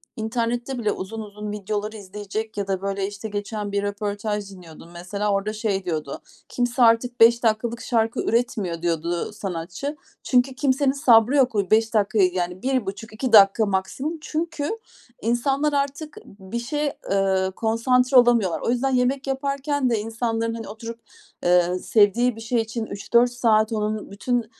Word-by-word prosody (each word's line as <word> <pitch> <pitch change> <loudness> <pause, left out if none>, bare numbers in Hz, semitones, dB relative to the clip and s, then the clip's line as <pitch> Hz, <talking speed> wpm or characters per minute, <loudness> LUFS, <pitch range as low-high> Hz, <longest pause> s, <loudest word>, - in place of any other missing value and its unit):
internette 235 +3 -2
bile 215 -3 0
uzun 220 +4 -5
uzun 210 0 -7
videoları 210 +1 -4
izleyecek 205 +2 -6
ya 200 -1 -2
da 190 -1 -1
böyle 195 0 -2
işte 205 +2 -7
geçen 205 0 -4
bir 200 0 -1
röportaj 205 0 -3
dinliyordum. 170 -3 -13
Mesela 200 +4 -3
orada 200 +2 -1
şey 210 -3 -2
diyordu, 155 -5 -4 0.3
kimse 245 +1 -1
artık 235 +1 +3
5 235 +1 +6
dakikalık 230 +1 0
şarkı 225 -1 0
üretmiyor 210 -8 -1
diyordu, 170 -1 -1
ııı, 175 - -4
sanatçı. 195 - -5 0.3
Çünkü 255 +1 +2
kimsenin 275 0 +2
sabrı 255 -3 +4
yok. 255 -5 +3
O 200 -3 0
5 225 +1 +3
dakikayı, 205 -3 +2
yani 180 0 -3
1,5-2 225 -1 -2
dakika 205 +1 +7
maksimum. 205 - -2
Çünkü 315 -1 -3 0.5
insanlar 270 +6 +1
artık 285 +2 -2
bir 195 +3 -7
şeye, 290 +4 -2
ııı, 190 -1 +1
konsantre 250 +5 +2
olamıyorlar. 230 -9 +4
O - - -2
yüzden 260 +2 +1
yemek 260 +2 0
yaparken 275 0 -1
de 230 -2 +1
insanların 225 +1 -2
hani 230 -2 -6
oturup, 230 +2 -8 0.4
eee, 180 +1 +3
sevdiği 225 +5 +3
bir 225 - -10
şey 230 +1 0
için 225 0 -4
3-4 235 +4 +2
saat 220 -3 +2
onun 215 -1 -2
bütün, 240 +3 -1
220 Hz, 155 wpm, -23 LUFS, 200-245 Hz, 0.5 s, dakika